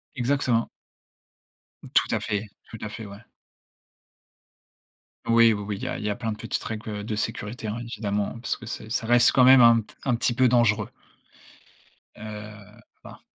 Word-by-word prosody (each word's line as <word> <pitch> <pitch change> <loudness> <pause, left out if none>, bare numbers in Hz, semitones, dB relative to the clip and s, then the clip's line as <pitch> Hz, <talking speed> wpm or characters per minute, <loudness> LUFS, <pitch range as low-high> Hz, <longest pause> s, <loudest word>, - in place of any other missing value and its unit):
Exactement. 125 -2 0 1.3
Tout - - +4
à - - 0
fait, 105 +1 -3 0.2
tout 115 - -9
à 105 - -4
fait, 105 +1 -8
ouais. 100 0 -10 2.1
Oui, 115 -1 +5
oui 105 - -4
oui, 105 0 -4
il - - -9
y - - -2
a - - -4
il - - -7
y 105 - -1
a 105 - -1
plein 115 -2 -3
de 105 - -6
petites - - -4
règles, 110 0 -6
heu, 105 -1 -5
de 110 0 -3
sécurité 110 +1 -4
hein, 105 +2 -3
évidemment, 105 -1 -3
parce 120 - -3
que 120 - -12
c'est 110 -1 -7
ça 115 - -2
reste 120 +1 +5
quand 130 - +5
même 130 0 +8
un 115 -2 +6 0.2
un 125 -3 +1
petit 120 +1 0
peu 130 +1 +3
dangereux. 115 -4 +2 1.3
Heu, 105 0 -10 0.2
pa - - -13
110 Hz, 180 wpm, -25 LUFS, 105-120 Hz, 2.1 s, même